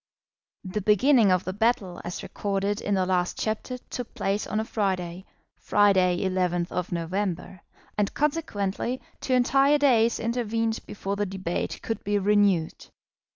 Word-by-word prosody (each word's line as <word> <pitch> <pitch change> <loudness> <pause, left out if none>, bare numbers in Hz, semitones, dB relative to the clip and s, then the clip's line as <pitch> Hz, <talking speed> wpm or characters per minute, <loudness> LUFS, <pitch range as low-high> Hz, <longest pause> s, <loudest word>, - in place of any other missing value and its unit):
The 190 +3 -3
beginning 215 +2 +4
of 180 -1 +2
the 185 - -4
battle 205 -4 0
as 175 - -5
recorded 200 0 -2
in 205 - 0
the 185 -1 +1
last 180 -1 0
chapter 220 +4 -2
took 245 -1 -8
place 200 +2 -1
on 215 - -1
a 220 - -1
Friday, 185 -4 -2 0.3
Friday, 185 -3 +3
11th 180 -1 -1
November, 180 +1 -3 0.4
and 205 - +1
consequently 255 -6 -1 0.2
two 260 - -2
entire 270 +3 +4
days 235 -5 +3
intervened 230 -1 -1
before 200 -1 -4
the 205 0 0
debate 185 -2 -4
could 225 - -3
be 205 +1 +1
renewed. 200 -4 +2
205 Hz, 140 wpm, -26 LUFS, 185-225 Hz, 0.4 s, beginning